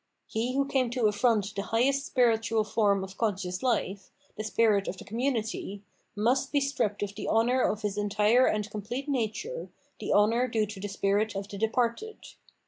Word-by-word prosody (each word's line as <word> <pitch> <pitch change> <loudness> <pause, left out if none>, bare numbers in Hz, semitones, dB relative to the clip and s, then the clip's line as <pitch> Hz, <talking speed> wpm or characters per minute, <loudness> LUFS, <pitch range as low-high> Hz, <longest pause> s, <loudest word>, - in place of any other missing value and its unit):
He 235 +4 -2
who 275 0 +2
came 265 -3 +1
to 245 0 -2
afiront 210 -1 +2
the 200 - -2
highest 270 +7 +1
spiritual 225 -3 +2
form 205 -2 +1
of 190 0 -9
conscious 190 -5 -1
life, 200 -6 -1 0.3
the 215 - -4
spirit 215 -2 +2
of 185 - -4
the - - -10
com 225 +3 -5
munity, 225 -6 -2 0.3
must 250 +6 +1
be 290 - +3
stripped 220 -8 -1
of 200 -1 -4
the 205 - -6
honour 240 +3 +3
of 215 -2 0
his 205 0 -1
entire 210 +4 +3
and 210 -1 0
complete 235 +7 -5
nature, 280 - -2 0.3
the - - -3
honour 230 +5 +3
due 225 -3 +1
to 210 -1 -9
the 205 - -4
spirit 200 +2 0
of 195 0 -4
the 200 - -7
departed. 235 - 0
220 Hz, 185 wpm, -28 LUFS, 205-245 Hz, 0.3 s, be